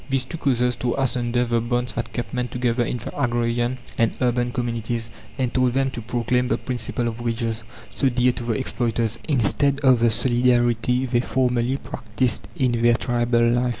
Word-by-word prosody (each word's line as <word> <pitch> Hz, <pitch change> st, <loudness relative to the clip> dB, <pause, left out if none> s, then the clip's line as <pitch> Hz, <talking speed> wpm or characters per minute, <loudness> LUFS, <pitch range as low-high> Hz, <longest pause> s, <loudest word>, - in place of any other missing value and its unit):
These 135 Hz, -1 st, +1 dB
two 160 Hz, +6 st, -7 dB
causes 125 Hz, -3 st, +1 dB
tore 120 Hz, -1 st, -1 dB
asunder 120 Hz, -2 st, +1 dB
the 115 Hz, -1 st, +1 dB
bonds 120 Hz, +1 st, -1 dB
that 115 Hz, -1 st, -4 dB
kept 120 Hz, -, -5 dB
men 125 Hz, -1 st, -1 dB
together 120 Hz, -1 st, 0 dB
in 125 Hz, -, -2 dB
the 115 Hz, -, -8 dB
agrarian 120 Hz, +1 st, 0 dB, 0.2 s
and 115 Hz, -1 st, +3 dB
urban 120 Hz, -1 st, +1 dB
communities, 115 Hz, -2 st, -3 dB, 0.3 s
and 130 Hz, -2 st, -1 dB
taught 130 Hz, -1 st, +2 dB
them 135 Hz, 0 st, +1 dB
to 120 Hz, -, -6 dB
proclaim 125 Hz, +2 st, 0 dB
the -, -, +1 dB
principle 120 Hz, -1 st, -2 dB
of 115 Hz, 0 st, -4 dB
wages, 115 Hz, -1 st, -2 dB, 0.3 s
so 135 Hz, -, +2 dB
dear 125 Hz, 0 st, +3 dB
to 120 Hz, -, -6 dB
the 120 Hz, -, 0 dB
exploiters, 115 Hz, -2 st, -1 dB
instead 140 Hz, +1 st, +2 dB
of 130 Hz, -3 st, +5 dB
the 115 Hz, 0 st, +4 dB
solidarity 120 Hz, +1 st, +2 dB
they 120 Hz, -1 st, +1 dB
formerly 125 Hz, 0 st, +1 dB
practiced 115 Hz, -2 st, -2 dB
in 130 Hz, -6 st, +1 dB
their 120 Hz, 0 st, +5 dB
tribal 120 Hz, -1 st, +1 dB
life. 120 Hz, +1 st, +2 dB
120 Hz, 185 wpm, -23 LUFS, 120-125 Hz, 0.3 s, of